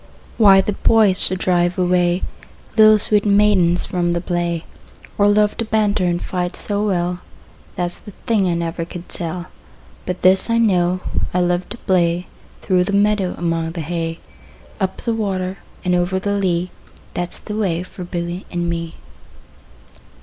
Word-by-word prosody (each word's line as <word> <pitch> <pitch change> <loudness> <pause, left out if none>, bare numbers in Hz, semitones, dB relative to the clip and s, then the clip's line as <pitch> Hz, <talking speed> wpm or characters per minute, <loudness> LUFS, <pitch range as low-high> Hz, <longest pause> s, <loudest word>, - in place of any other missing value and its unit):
Why 195 -3 +7
the 210 - -2
boys 205 -3 +4
should 185 - +4
drive 175 -1 +1
away 180 0 +1 0.5
Little 215 -1 +7
sweet 210 0 +2
maidens 200 -4 +3
from 175 -1 -1
the 170 - -1
play, 170 -2 -2 0.5
Or 205 - +3
love 210 0 +2
to 230 - -2
banter 210 -3 +1
and 175 -1 0
fight 180 -1 -3
so 205 0 -2
well, 180 -3 -1 0.6
That 175 -1 -1
's - - -6
the 205 - -12
thing 210 -5 +2
I 170 - 0
never 170 0 -3
could 175 +1 -9
tell. 165 -2 -2 0.7
20 - - -26
But 180 0 -4
this 185 +4 +4
I 230 - +2
know, 185 -5 +2 0.3
I - - +3
love 175 0 -1
to 235 - -6
play 175 -3 0 0.4
Through 180 -2 +2
the 200 - -3
meadow, 200 -2 +1
among 165 -1 -2
the 170 - -4
hay; 165 +1 -3 0.6
Up 190 -2 -2
the 230 - 0
water 195 -3 -3 0.3
and 180 - +1
over 180 +1 +1
the 200 +2 -2
lea, 185 -3 -1 0.4
That 175 0 -4
's - - -9
the 210 - -7
way 180 -5 -1
for 185 0 -10
Billy 175 +1 -5
and 175 -1 -3
me. 165 -1 -4
180 Hz, 170 wpm, -19 LUFS, 175-200 Hz, 0.7 s, Why